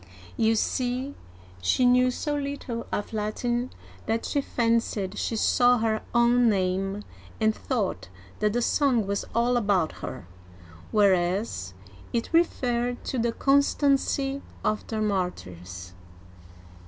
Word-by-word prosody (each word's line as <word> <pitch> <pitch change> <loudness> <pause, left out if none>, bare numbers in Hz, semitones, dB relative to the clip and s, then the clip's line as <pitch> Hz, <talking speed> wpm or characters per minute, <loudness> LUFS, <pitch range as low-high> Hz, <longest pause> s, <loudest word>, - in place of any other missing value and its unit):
You 225 0 +3
see, 255 +4 -1 0.5
she 170 - +2
knew 250 +1 +5
so 290 +4 -2
little 280 -5 -4
of 205 - -3
Latin 240 +4 -1 0.4
that 225 +1 0
she 285 - 0
fancied 230 -6 0
she 225 - -2
saw 245 +3 +4
her 220 -1 0
own 240 0 +5
name, 195 +1 0 0.4
and 220 -1 +3
thought 200 - -2 0.3
that 210 -1 +1
the 240 0 +1
song 255 -7 +2
was 200 +1 -2
all 240 +1 +3
about 200 -8 +2
her, - - -6 0.7
whereas 185 - +1 0.4
it 235 +6 -2
referred 245 -7 +1
to 260 - -2
the 235 0 +1
constancy 275 0 +2 0.2
of 215 0 0
the 220 -1 -2
martyrs 90 - -4
230 Hz, 120 wpm, -26 LUFS, 200-250 Hz, 0.7 s, knew